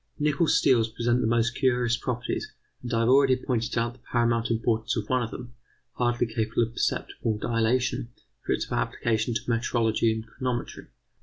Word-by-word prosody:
Nickel 150 Hz, +2 st, +1 dB
steels 120 Hz, -7 st, +3 dB
present 120 Hz, +2 st, 0 dB
the -, -, +1 dB
most 115 Hz, 0 st, +2 dB
curious 125 Hz, -3 st, +2 dB
properties, 120 Hz, -1 st, -3 dB, 0.3 s
and 125 Hz, -, -6 dB
I 115 Hz, -1 st, +2 dB
have 115 Hz, -, +2 dB
already 135 Hz, 0 st, +5 dB
pointed 120 Hz, -3 st, -2 dB
out 115 Hz, +1 st, 0 dB
the 130 Hz, -, -20 dB
paramount 115 Hz, -1 st, 0 dB
importance 115 Hz, 0 st, 0 dB
of 105 Hz, -2 st, -3 dB
one 130 Hz, -1 st, +1 dB
of 115 Hz, -, -2 dB
them, 120 Hz, -1 st, -9 dB, 0.4 s
hardly 120 Hz, 0 st, +1 dB
capable 110 Hz, 0 st, 0 dB
of 115 Hz, -, -3 dB
perceptible 110 Hz, -2 st, -1 dB
dilatation, 120 Hz, +2 st, 0 dB, 0.3 s
for -, -, -3 dB
its -, -, -1 dB
application 110 Hz, -, 0 dB
to -, -, 0 dB
metrology 115 Hz, -1 st, +1 dB
and 110 Hz, 0 st, -4 dB
chronometry. 120 Hz, +1 st, -4 dB
120 Hz, 170 wpm, -26 LUFS, 115-125 Hz, 0.4 s, already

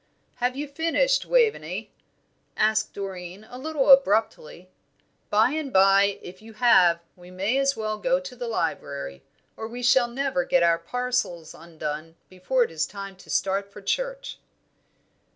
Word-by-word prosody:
"Have 250 Hz, +1 st, -1 dB
you 290 Hz, +2 st, -4 dB
finished, 330 Hz, -, +1 dB
Waveney?" 475 Hz, -3 st, +1 dB, 0.7 s
asked 215 Hz, 0 st, +1 dB
Doreen, 190 Hz, 0 st, -7 dB
a 250 Hz, -, -10 dB
little 290 Hz, -1 st, +2 dB
abruptly. 220 Hz, -, +3 dB, 0.6 s
"By 220 Hz, +4 st, +3 dB
and 305 Hz, -3 st, -3 dB
bye, 195 Hz, 0 st, +4 dB
if 185 Hz, +2 st, -11 dB
you 225 Hz, +1 st, -13 dB
have, 180 Hz, -7 st, +4 dB
we 180 Hz, 0 st, -15 dB
may 195 Hz, +8 st, -1 dB
as 275 Hz, 0 st, +1 dB
well 215 Hz, -1 st, -3 dB
go 260 Hz, +5 st, +1 dB
to 275 Hz, -2 st, -9 dB
the 245 Hz, -1 st, -5 dB
library, 140 Hz, -, -3 dB, 0.3 s
or 220 Hz, -, -6 dB
we 245 Hz, +2 st, -7 dB
shall 250 Hz, 0 st, +4 dB
never 255 Hz, -6 st, -1 dB
get 175 Hz, 0 st, +2 dB
our 170 Hz, 0 st, +3 dB
parcels 210 Hz, -5 st, -3 dB
undone 160 Hz, -1 st, -7 dB
before 215 Hz, +8 st, 0 dB
it 230 Hz, -, -5 dB
is 160 Hz, -1 st, -1 dB
time 195 Hz, -1 st, -8 dB
to -, -, -17 dB
start 195 Hz, +1 st, -1 dB
for 205 Hz, -, -11 dB
church." -, -, -3 dB
215 Hz, 150 wpm, -25 LUFS, 180-260 Hz, 0.7 s, bye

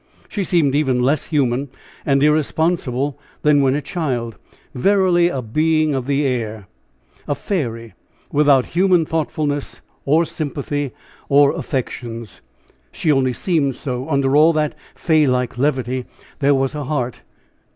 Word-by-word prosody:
She 205 Hz, -, -3 dB
seemed 165 Hz, -6 st, +2 dB
even 135 Hz, -4 st, +1 dB
less 140 Hz, +4 st, +1 dB
human 140 Hz, -3 st, 0 dB, 0.4 s
and 140 Hz, -1 st, +3 dB
irresponsible 150 Hz, -3 st, 0 dB, 0.2 s
than 150 Hz, -1 st, +4 dB
when 135 Hz, 0 st, +2 dB
a 145 Hz, -, -2 dB
child 125 Hz, -, -3 dB, 0.4 s
verily 185 Hz, +2 st, +3 dB
a 135 Hz, -7 st, -3 dB
being 155 Hz, +6 st, +1 dB
of 130 Hz, -2 st, -3 dB
the 140 Hz, +1 st, +1 dB
air, 110 Hz, -5 st, -2 dB, 0.6 s
a 145 Hz, -, 0 dB
fairy, 115 Hz, -, -3 dB, 0.4 s
without 140 Hz, -3 st, +4 dB
human 180 Hz, -2 st, +3 dB
thoughtfulness, 150 Hz, -2 st, -2 dB, 0.2 s
or 155 Hz, +4 st, +3 dB
sympathy, 145 Hz, -2 st, -3 dB, 0.4 s
or 140 Hz, 0 st, +5 dB
affections! 115 Hz, -, -5 dB, 0.5 s
She 155 Hz, -, 0 dB
only 130 Hz, -3 st, +2 dB
seemed 145 Hz, -4 st, 0 dB
so 130 Hz, 0 st, -4 dB
under 140 Hz, -2 st, +1 dB
all 155 Hz, +3 st, +6 dB
that 155 Hz, -1 st, 0 dB, 0.2 s
fay 155 Hz, -3 st, +2 dB
like 125 Hz, -1 st, -1 dB
levity 130 Hz, -3 st, -1 dB, 0.3 s
there 140 Hz, 0 st, +3 dB
was 135 Hz, +1 st, 0 dB
a 150 Hz, -2 st, -4 dB
heart. 125 Hz, -4 st, -3 dB
140 Hz, 135 wpm, -19 LUFS, 130-155 Hz, 0.6 s, all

